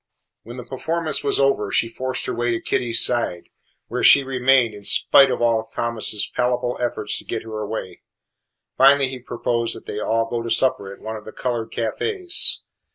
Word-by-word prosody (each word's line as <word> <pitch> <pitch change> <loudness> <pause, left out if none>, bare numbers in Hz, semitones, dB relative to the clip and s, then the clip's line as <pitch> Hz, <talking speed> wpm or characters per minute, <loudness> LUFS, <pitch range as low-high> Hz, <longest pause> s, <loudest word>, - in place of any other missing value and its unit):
When 120 +3 -11
the 125 - -7
performance 155 +6 -3
was 140 - +1
over 135 -7 +1
she 115 - +1
forced 130 +2 -4
her - - -3
way 120 +1 -2
to 115 -1 -1
Kitty's 115 -2 +3
side, 115 -8 -2 0.4
where - - -4
she 140 - +7
remained 130 -3 +2
in 105 - -11
spite 135 +6 +5
of 125 -1 -2
all 115 -1 +1
Thomas's 115 -2 -1
palpable 125 0 -1
efforts 120 -1 -2
to - - -12
get - - -5
her 110 -1 -7
away. 105 -4 -6 0.7
Finally 135 0 +5
he 130 -1 -7
proposed 115 -1 -2
that - - -12
they 105 - -5
all 115 +1 0
go 115 0 -3
to 115 - -6
supper 110 -6 +1
at 100 - -13
one 110 0 -6
of 105 - -13
the 110 - -9
coloured 120 -2 -4
cafes. 355 - 0
120 Hz, 190 wpm, -21 LUFS, 110-130 Hz, 0.7 s, she